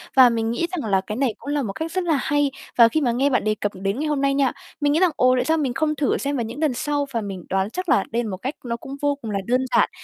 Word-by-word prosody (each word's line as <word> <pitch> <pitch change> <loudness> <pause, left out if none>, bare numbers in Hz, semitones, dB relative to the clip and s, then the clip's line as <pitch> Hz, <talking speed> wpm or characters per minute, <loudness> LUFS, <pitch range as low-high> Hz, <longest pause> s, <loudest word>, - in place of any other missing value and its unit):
Và 255 -2 +8
mình 225 -1 -1
nghĩ 335 +9 -1
rằng 290 - -3
là 190 -1 +3
cái 210 +2 -6
này 255 -3 0
cũng 285 - -9
là 290 - +1
một 205 -7 -3
cách 320 +6 -4
rất 370 0 -1
là 320 -4 +2
hay. 290 -2 +1 0.3
Và 230 -1 +9
khi 310 +6 0
mà 245 - +2
nghe 265 +4 +2
bạn 255 - +1
đề 215 0 +1
cập 205 -1 -2
đến 195 +6 -2
ngày 310 - -1
hôm 285 -2 0
nay 275 0 +2
nha, 275 -2 +2 0.3
mình 290 0 +3
nghĩ 320 - +3
rằng, 370 -2 +4
ồ, 255 0 +4
tại - - +1
sao 320 0 +2
mình 270 -5 -1
không 305 +2 0
thử 285 -2 +1
xem 280 0 -2
vào 235 - 0
những 230 +6 -7
lần 305 -5 +1
sau. 290 +3 -1
Và 230 - 0
mình 195 -4 -6
đoán 190 +1 0
chắc 365 - -5
là 195 - +4
đây 235 +1 0
là 220 - -4
một 185 - -4
cách 260 +9 -4
nó 235 -1 -2
cũng 270 +4 -8
vô 285 -1 +2
cùng 220 -2 -5
là 200 - -1
đơn 255 +2 +1
giản, - - +4
260 Hz, 335 wpm, -23 LUFS, 225-290 Hz, 0.3 s, Và